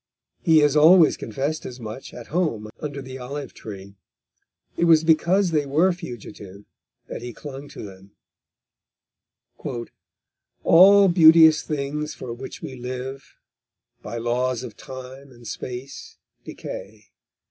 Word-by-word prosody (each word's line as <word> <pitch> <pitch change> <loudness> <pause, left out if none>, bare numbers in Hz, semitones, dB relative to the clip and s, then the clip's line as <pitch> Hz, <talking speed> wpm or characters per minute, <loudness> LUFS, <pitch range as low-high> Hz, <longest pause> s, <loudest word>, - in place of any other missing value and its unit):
He 160 -2 +4
has 150 -1 +3
always 160 +2 +6
confessed 140 +8 -4
as 125 0 -8
much 110 +2 -8
at 120 - -11
home 115 -12 -1
under 145 -2 -6
the 130 0 -9
olive 135 +1 -7
tree; 100 -2 -10 0.8
it 170 - +1
was 165 -2 +5
because 170 +4 +3
they 150 -3 0
were 165 +7 +3
fugitive 105 - -10 0.4
that - - -7
he 120 0 -7
clung 140 +1 -9
to - - -10
them: 95 -1 -13 2.5
_All 195 +2 +7
beauteous 160 -2 +7
things 150 0 -4
for 120 -2 -7
which 130 +3 -9
we 130 - -6
live 130 +2 -7 0.7
By 115 +3 -6
laws 120 +1 -1
of 120 -4 -9
time 130 +1 -10
and 120 -1 -16
space 125 +5 -8 0.3
decay. - - -9
135 Hz, 125 wpm, -23 LUFS, 120-160 Hz, 2.5 s, All